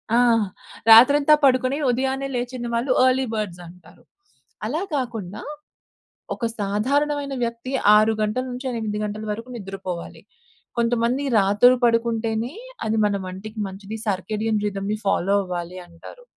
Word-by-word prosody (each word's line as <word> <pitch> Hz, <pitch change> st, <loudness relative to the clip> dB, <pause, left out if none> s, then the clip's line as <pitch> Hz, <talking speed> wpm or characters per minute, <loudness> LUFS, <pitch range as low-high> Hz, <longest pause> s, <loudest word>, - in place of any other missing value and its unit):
ఆ! -, -, +5 dB, 0.7 s
రాత్రంతా 280 Hz, +6 st, +8 dB
పడుకొని 255 Hz, +1 st, +2 dB
ఉదయాన్నే 265 Hz, +2 st, -1 dB
లేచిన 245 Hz, 0 st, -3 dB
వాళ్ళు 245 Hz, +3 st, 0 dB
ఎర్లీ 260 Hz, +1 st, +3 dB
బర్డ్స్ 205 Hz, -5 st, -4 dB
అంటారు. 175 Hz, 0 st, -17 dB, 0.6 s
అలా 290 Hz, +10 st, -2 dB
కాకుండా, 225 Hz, -7 st, -4 dB, 0.9 s
ఒక 235 Hz, -, -3 dB
సాధారణమైన 280 Hz, +8 st, 0 dB
వ్యక్తి 235 Hz, +2 st, -5 dB, 0.2 s
6 215 Hz, +1 st, +4 dB
గంటల 215 Hz, +4 st, -1 dB
నుంచి 250 Hz, +2 st, -6 dB
8 220 Hz, -3 st, -3 dB
గంటల 210 Hz, +1 st, -5 dB
వరకు 230 Hz, +4 st, -7 dB
నిద్రపోవాలి. 195 Hz, -4 st, -7 dB, 0.6 s
కొంతమంది 235 Hz, +3 st, +1 dB, 0.2 s
రాత్రి 205 Hz, +6 st, +5 dB
పడుకుంటేనే 230 Hz, 0 st, 0 dB, 0.3 s
అది 220 Hz, 0 st, 0 dB
మన 205 Hz, -, 0 dB
వంటికి 200 Hz, +4 st, -8 dB
మంచిది, 200 Hz, +3 st, -8 dB
సర్కేడియం 210 Hz, +3 st, -1 dB
రిదమ్‌ని 205 Hz, +1 st, -3 dB
ఫాలో 195 Hz, +1 st, +2 dB
అవ్వాలి 180 Hz, 0 st, -5 dB
అంటారు, 175 Hz, -, -14 dB
225 Hz, 120 wpm, -23 LUFS, 200-255 Hz, 0.9 s, రాత్రంతా